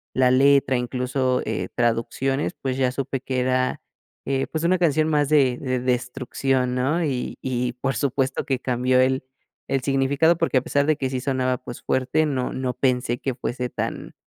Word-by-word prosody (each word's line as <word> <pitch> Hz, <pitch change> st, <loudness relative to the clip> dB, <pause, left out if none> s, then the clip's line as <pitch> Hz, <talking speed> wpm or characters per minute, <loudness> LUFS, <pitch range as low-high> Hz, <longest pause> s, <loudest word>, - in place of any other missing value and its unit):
la 130 Hz, -1 st, +4 dB
letra, 135 Hz, 0 st, +4 dB
incluso, 125 Hz, +1 st, -1 dB
eh, -, -, -3 dB
traducciones, 120 Hz, +4 st, 0 dB
pues 130 Hz, -1 st, -2 dB
ya 130 Hz, -1 st, +2 dB
supe 135 Hz, 0 st, -3 dB
que 130 Hz, 0 st, -3 dB
era, 130 Hz, 0 st, 0 dB, 0.4 s
eh, 135 Hz, 0 st, 0 dB
pues 160 Hz, 0 st, -4 dB
una 180 Hz, +2 st, +3 dB
canción 155 Hz, -3 st, +2 dB
más 150 Hz, -2 st, +2 dB
de 135 Hz, -4 st, +3 dB, 0.3 s
destrucción, 125 Hz, +1 st, -1 dB
¿no? 140 Hz, +7 st, +1 dB
Y 135 Hz, -5 st, -2 dB
y 125 Hz, -1 st, -1 dB
por 135 Hz, +2 st, -2 dB
supuesto 135 Hz, -1 st, -1 dB
que 135 Hz, -2 st, -1 dB
cambió 125 Hz, 0 st, +2 dB
el 130 Hz, +1 st, +1 dB, 0.4 s
el 135 Hz, -, 0 dB
significado, 140 Hz, +5 st, +2 dB
porque, 165 Hz, -5 st, +1 dB
a -, -, -8 dB
pesar 140 Hz, +2 st, +1 dB
de 155 Hz, +1 st, +3 dB
que 135 Hz, -3 st, -2 dB
sí 130 Hz, -1 st, -2 dB
sonaba, 130 Hz, -1 st, 0 dB
pues 120 Hz, -1 st, -9 dB
fuerte, 130 Hz, +4 st, +1 dB
no 130 Hz, -4 st, -2 dB
no 130 Hz, -1 st, -2 dB
pensé 125 Hz, -2 st, 0 dB
que 135 Hz, +1 st, -2 dB
fuese 125 Hz, 0 st, -3 dB
tan, -, -, -4 dB
130 Hz, 175 wpm, -23 LUFS, 125-140 Hz, 0.4 s, la